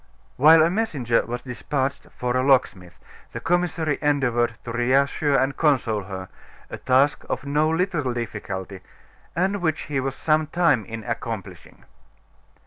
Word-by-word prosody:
While 155 +4 +7
a 165 - +2
messenger 145 - 0
was 120 +1 -5
despatched 135 +2 -3
for 125 0 -1
a 130 - +2
locksmith, 125 -10 +1 0.4
the - - -4
commissary 170 -4 0
endeavored 120 -6 +1
to 120 - -5
reassure 135 +4 +2
and 135 0 +1
console 120 - +1
her, 95 -1 -7 0.4
a - - -6
task 135 +3 +2
of - - -3
no 150 +2 +1
little 165 -5 0
difficulty, 100 -5 -5 0.6
and 190 +3 0
which 160 -2 0
he 140 -2 -3
was 135 0 -3
some 155 0 +1
time 150 - +2
in 115 -1 -7
accomplishing. 115 -3 -6
135 Hz, 140 wpm, -23 LUFS, 120-155 Hz, 0.6 s, While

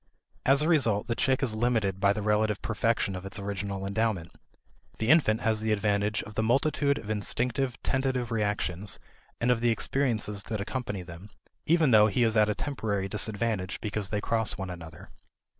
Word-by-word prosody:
As 140 +2 +5
a - - +1
result, 120 -11 +3
the 115 - -1
chick 130 +3 +1
is 120 -5 +1
limited 110 -4 0
by 100 0 +4
the 105 +1 -2
relative 105 0 +1
perfection 110 -2 0
of 90 - -6
its 95 +1 -5
original 100 -1 -4
endowment. 100 -4 -1 0.7
The 115 +4 +2
infant 120 -9 +4
has 110 -1 +1
the 110 0 0
advantage 105 0 0
of 110 - -10
the 110 - 0
multitude 140 +4 +2
of 110 - -6
instinctive 120 +4 -1
tentative 130 -3 -1
reactions 105 -3 -1 0.4
and 120 +1 +2
of 120 -2 +1
the 120 - +3
experiences 115 -4 0
that 110 -2 -3
accompany 105 -3 -4
them, 85 +3 -11 0.4
even 160 -4 +4
though 105 -1 +7
he 120 +4 +1
is 110 -1 +2
at 105 -1 +4
a 105 - 0
temporary 105 -9 -2
disadvantage 105 -2 0
because 105 -2 -3
they 105 -1 -1
cross 110 0 +2
one 95 -1 -5
another. 85 -2 -10
110 Hz, 180 wpm, -28 LUFS, 100-120 Hz, 0.7 s, though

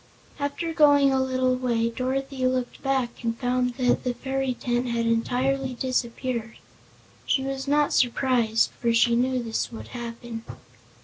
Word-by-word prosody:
After 285 +4 -2
going 285 -3 +5
a 265 - +2
little 255 -1 +1
way 235 -2 0
Dorothy 260 +1 -1
looked 255 -1 -2
back 260 -4 -1
and 230 0 -1
found 250 0 0
that 250 -1 +1
the 250 -1 -1
fairy 265 -1 -2
tent 240 +1 -1
had 235 -1 0
entirely 255 +3 0
disappeared. 240 -2 -2 0.7
She 265 - +2
was 270 0 -4
not 295 +1 +2
surprised, 240 -3 +2
for 235 -1 0
she 235 0 +4
knew 255 +1 +1
this 225 +1 -2
would 225 - -9
happen. 235 -1 -7
255 Hz, 145 wpm, -25 LUFS, 235-265 Hz, 0.7 s, going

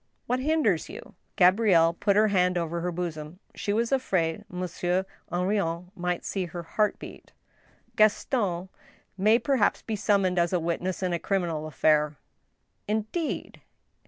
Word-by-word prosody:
" - - -46
What 250 +1 0
hinders 265 - +1
you? - - -10
" - - -45
Gabrielle 180 -3 +5
put 200 +3 +1
her 215 +1 +4
hand 180 -2 +2
over 170 0 -2
her 180 +1 -2
bosom; 165 -2 -5 0.2
she 205 - -3
was 230 +4 0
afraid 185 -11 0
Mon 180 0 -4
sieur 180 +2 -1 0.3
Henrion 180 -1 -1
might 180 -2 -2
see 190 -2 -2
her 170 0 -7
heart 210 +5 0
beat. - - -12 0.6
Gaston 205 -4 +1 0.5
may 210 +4 +4
perhaps 265 -3 +1
be 220 - -3
summoned 195 -3 +2
as 170 +1 +1
a 180 - +2
witness 170 +3 -2
in 180 -1 0
a 170 - 0
criminal 170 -6 -1
affair." 150 -1 +2 0.4
" - - -48
Indeed 220 +10 -3
180 Hz, 160 wpm, -27 LUFS, 170-210 Hz, 0.6 s, Gabrielle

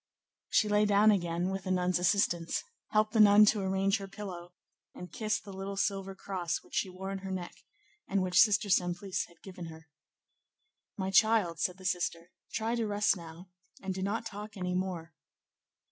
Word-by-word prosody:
She 215 - +3
lay 210 0 +3
down 205 +1 +5
again, 175 -1 0
with 195 0 -4
the - - -3
nun's 180 -1 +1
assistance, 175 -2 +1 0.2
helped 215 +1 +1
the 225 - +2
nun 210 0 +8
to 210 -1 +2
arrange 195 +2 +1
her 195 - -7
pillow, 185 -3 -8 0.4
and 180 - -9
kissed 215 -1 -2
the 200 - -9
little 195 +1 -5
silver 195 -1 -1
cross 180 -4 -3
which - - -22
she 190 - 0
wore 190 +1 -6
on 195 - -4
her 190 0 -7
neck, 185 -2 -4 0.5
and 195 -2 +1
which 180 -1 +2
Sister 210 -1 +5
Simplice 180 0 0
had 170 -1 -23
given 180 -3 -8
her. 160 -1 -12 1.1
"My 190 -1 -2
child," 205 -5 +3
said 180 +4 -1
the 190 - -13
sister, 175 -1 -2 0.2
"try 225 +1 -1
to 230 -2 -1
rest 205 0 +2
now, 170 +1 -11 0.3
and 190 -1 -4
do 190 - -5
not 210 +4 -2
talk 210 -1 -8
any 180 -1 -2
more." 180 -3 -3
190 Hz, 185 wpm, -31 LUFS, 180-205 Hz, 1.1 s, nun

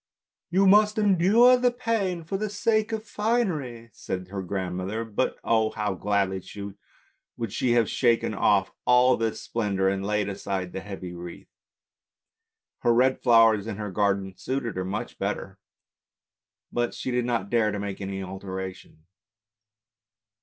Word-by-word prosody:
" - - -68
You 190 +2 +3
must 210 +2 +5
endure 210 +5 +5
the 250 0 +3
pain 220 -8 -1
for 165 +5 -4
the 210 +2 -2
sake 215 +2 +1
of 220 -1 -2
the - - -27
finery! 170 - -1
" - - -43
said 90 -1 -5
her 100 0 -4
grandmother. 95 +3 -3
But 110 +3 -1
oh! 110 -1 +2
how 105 -2 -2
gladly 95 -1 0 1.0
would 115 -4 -4
she 125 -2 +1
have 115 -3 +3
shaken 120 -3 +1
off 100 -1 +2
all 125 +1 +5
this 115 -1 -2
splendour, 100 -4 0
and 95 0 -2
laid 105 0 0
aside 95 -2 -4
the - - -3
heavy 95 -3 -7
wreath. 85 0 -10 1.3
Her 120 - +2
red 130 +2 +3
flowers 115 -4 +5
in 110 - -4
her 105 -2 -5
garden 100 -1 0
suited 120 +4 -3
her 95 0 -2
much 95 +2 -5
better, - - -4 1.1
but 120 0 -1
she 130 - -4
did 125 -1 0
not 115 -5 -2
dare 115 -3 +2
to 105 - -3
make 100 -1 -5
any 95 0 -4
alteration. 95 -3 -7
110 Hz, 155 wpm, -26 LUFS, 95-145 Hz, 1.3 s, must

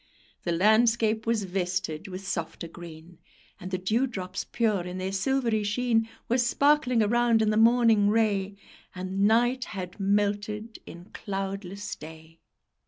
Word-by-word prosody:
The 175 - 0
landscape 220 +4 +3
was 230 -2 +1
vested 180 -3 -3
with 190 0 -7
softer 170 -2 -4
green, 170 0 -12 0.4
And 185 - -7
the 185 - -1
dewdrops 190 -2 -2
pure 215 -5 +1
in 180 +1 -6
their 185 +1 -3
silvery 230 +2 0
sheen 225 +1 0 0.2
Were 245 +2 +1
sparkling 255 -1 +3
around 235 +1 +3
in 215 -1 +2
the - - 0
morning 225 -2 +4
ray, 205 -3 +1 0.4
And 190 +2 0
night 240 +3 +2
had 180 0 -7
melted 205 +2 -1
in 175 +3 -12
cloudless 195 -1 -5
day. 160 +1 -13
205 Hz, 135 wpm, -27 LUFS, 185-225 Hz, 0.4 s, morning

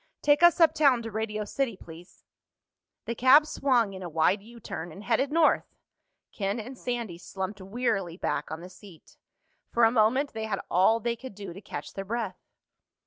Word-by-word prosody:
"Take 290 +1 +4
us 345 +1 +6
uptown 285 -7 +4
to 225 - -6
Radio 215 0 -3
City, 235 -2 -2
please." 170 +1 -14 0.8
The 235 - -2
cab 260 +6 +6
swung 245 -9 +1
in 190 - -8
a 180 - -5
wide 165 +5 +2
U 235 +3 -14
turn 175 -5 -6
and 195 +6 -11
headed 270 +7 +1
north. 320 -1 +2 0.6
Ken 200 +2 -2
and 250 +5 -7
Sandy 235 -9 -4
slumped 190 +2 -6
wearily 195 -4 -2
back - - -2
on 160 +1 -6
the 180 - -9
seat. 185 -3 -16 0.5
For 235 - +1
a 225 - +6
moment 250 +5 +2
they 220 -1 -4
had 205 -3 -2
all 190 +6 +4
they 235 +1 -1
could 255 -2 -10
do 200 -3 -8
to 195 - -11
catch 145 -6 -7
their 195 - -5
breath. 215 -3 -3
220 Hz, 185 wpm, -27 LUFS, 190-245 Hz, 0.8 s, us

